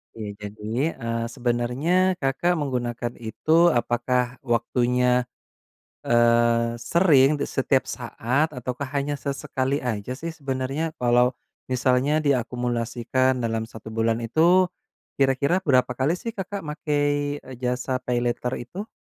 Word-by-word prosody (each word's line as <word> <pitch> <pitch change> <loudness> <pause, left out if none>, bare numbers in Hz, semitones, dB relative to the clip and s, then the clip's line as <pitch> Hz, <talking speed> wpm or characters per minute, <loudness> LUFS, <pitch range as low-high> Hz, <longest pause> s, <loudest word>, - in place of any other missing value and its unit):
Ya 105 -2 -5 0.2
jadi, 110 +9 -2
eee, 115 -2 -3
sebenarnya 130 +10 +1
Kakak 135 +7 +1
menggunakan 120 -5 -3
itu 155 +9 +3
apakah 125 -1 0
waktunya, 125 0 +1 0.7
eee, 115 0 +3
sering 150 -5 +4
di - - -1
setiap 135 -1 +1
saat, 125 +5 -1
ataukah 125 +2 -4
hanya 145 +1 -1
sesekali 140 -1 -2
aja 120 +2 -3
sih 165 +1 -5
sebenarnya, 140 +2 -3
kalau 125 +1 +3 0.3
misalnya 130 +4 +2
diakumulasikan 125 0 0
dalam 115 -2 -2
1 110 0 -10
bulan 115 0 +1
itu 165 +11 +4 0.5
kira-kira 140 +6 +2
berapa 130 -7 +2
kali 135 +8 0
sih 230 +4 -5
Kakak 195 -2 -5
makai 145 -1 -1 0.2
jasa 125 +1 -1
paylater 125 0 -1
itu? 190 - -7
130 Hz, 115 wpm, -24 LUFS, 120-145 Hz, 0.7 s, sering